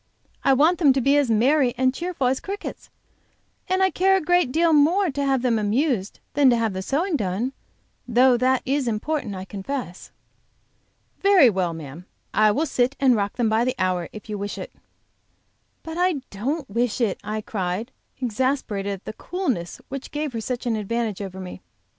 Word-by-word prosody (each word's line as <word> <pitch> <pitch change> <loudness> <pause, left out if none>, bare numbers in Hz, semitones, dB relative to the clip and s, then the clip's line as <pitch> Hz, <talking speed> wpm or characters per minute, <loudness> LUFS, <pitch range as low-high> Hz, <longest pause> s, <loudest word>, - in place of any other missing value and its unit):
"I 270 - +5
want 310 +6 +3
them 290 -6 +5
to 270 - +1
be 275 +3 +3
as 285 -4 +2
merry 250 +3 +3
and 255 0 +2
cheerful 340 -2 -3
as 260 +1 +2
crickets, 400 +1 -7 0.8
and 375 +1 +2
I 380 - +3
care 385 +1 +3
a - - +1
great 355 -4 +2
deal 330 +2 +3
more 335 +5 +4
to 280 +1 -2
have 270 -2 +1
them 235 -3 +2
amused 215 -1 0
than 285 -2 +5
to 240 - +4
have 225 -3 0
the 190 - -3
sewing 320 - 0
done, 215 +3 -1 0.5
though 250 +1 +5
that 255 +2 +2
is 275 -1 0
important, 230 0 -2
I 185 0 -6
confess." 200 -1 -6 1.1
"Very 380 - +6
well, 180 -4 -1
ma'am, 160 +3 -9 0.3
I 215 0 +5
will 280 +10 +1
sit 260 -2 0
and 260 -3 +4
rock 200 -1 -1
them 240 -2 +1
by 220 +2 +2
the 255 +1 0
hour 180 -3 -1
if 215 0 -11
you 210 -2 -4
wish 205 +1 -4
it." - - -7 1.1
"But 325 +1 -6
I 365 0 +3 0.2
don't 270 +9 -3
wish 235 +2 -1
it," 225 -6 0
I 215 0 -3
cried, 200 +3 -3 0.3
exasperated 240 -4 -1
at 195 -1 -7
the - - -5
coolness 260 - -3
which 275 0 -6
gave 295 -2 -3
her 225 - -3
such 250 +2 -4
an 235 -2 +1
advantage 220 -1 -2
over 190 -1 -6
me. 185 -1 -8
250 Hz, 190 wpm, -23 LUFS, 210-290 Hz, 1.1 s, Very